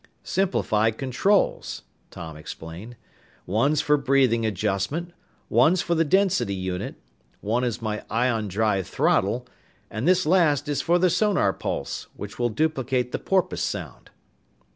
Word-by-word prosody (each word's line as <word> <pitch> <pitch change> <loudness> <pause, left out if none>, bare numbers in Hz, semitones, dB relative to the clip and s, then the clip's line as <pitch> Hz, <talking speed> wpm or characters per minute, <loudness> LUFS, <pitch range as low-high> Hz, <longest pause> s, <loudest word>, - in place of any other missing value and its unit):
"Simplified 115 - +1
controls," 135 +10 0 0.3
Tom 80 -2 -8
explained. 80 +8 -9 0.5
"One's 135 +10 +2
for 150 0 +3
breathing 130 -5 +2
adjustment, 105 - -2 0.3
one's 175 +3 +3
for 170 - 0
the 165 -1 +3
density 180 - +2
unit, 95 -1 -4 0.4
one 115 +4 -1
is 120 -2 -2
my 105 -1 -3
ion 115 -2 0
drive 100 -1 0
'throttle,' 115 +6 +1 0.5
and 110 +6 -2
this 185 0 +4
last 155 -4 +3
is 145 -1 0
for 175 +2 +3
the 180 0 +3
sonar 210 +1 +2
pulse - - -4
which - - -8
will 120 0 +2
duplicate 130 -1 0
the - - -2
porpoise 190 -2 0
sound." - - -5
125 Hz, 135 wpm, -25 LUFS, 105-160 Hz, 0.5 s, this